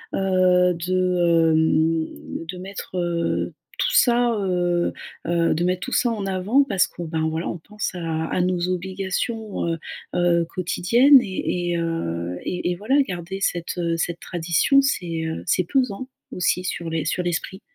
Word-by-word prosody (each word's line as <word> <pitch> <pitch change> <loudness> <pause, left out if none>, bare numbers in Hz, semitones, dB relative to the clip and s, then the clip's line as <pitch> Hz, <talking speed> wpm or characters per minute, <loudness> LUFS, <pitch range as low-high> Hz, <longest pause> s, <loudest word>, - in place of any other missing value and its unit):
heu, 185 -1 +3
de, 175 -1 +2
hem, 160 +1 0
de 180 - -6
mettre 190 0 -7
heu 170 -1 -1 0.3
tout - - +1
ça, 240 - +4
heu 175 -2 0 0.3
heu, 170 -1 +2
de 170 - 0
mettre 180 0 0
tout 260 - -4
ça 245 - +3
en 210 -3 -3
avant 195 +9 +2
parce 195 -8 +2
que 175 - -8
ben, 160 -1 -1
voilà, 160 +2 -3
on 175 - -5
pense 210 +5 -4
à 165 -2 -2
à 180 - -1
nos 180 0 0
obligations, 195 +4 -3
heu 165 - -1 0.4
heu, 175 -1 +3
quotidiennes 235 +10 +5
et 180 -3 -2
et 170 - 0
heu, 90 - -3
et 180 0 -2
et - - -1
voilà, 230 +10 +1
garder 180 -1 -5
cette, 175 -2 -1
heu, 170 -1 0
cette 170 +1 -2
tradition, 175 +11 +2
c'est, 170 -11 -1
heu, 160 0 -4
c'est 180 - +2
pesant 255 -1 0 0.2
aussi 180 0 0
sur 170 -2 -3
les 160 -2 -2
sur 170 - 0
l'esprit. 175 +3 -3
180 Hz, 165 wpm, -23 LUFS, 165-195 Hz, 0.4 s, quotidiennes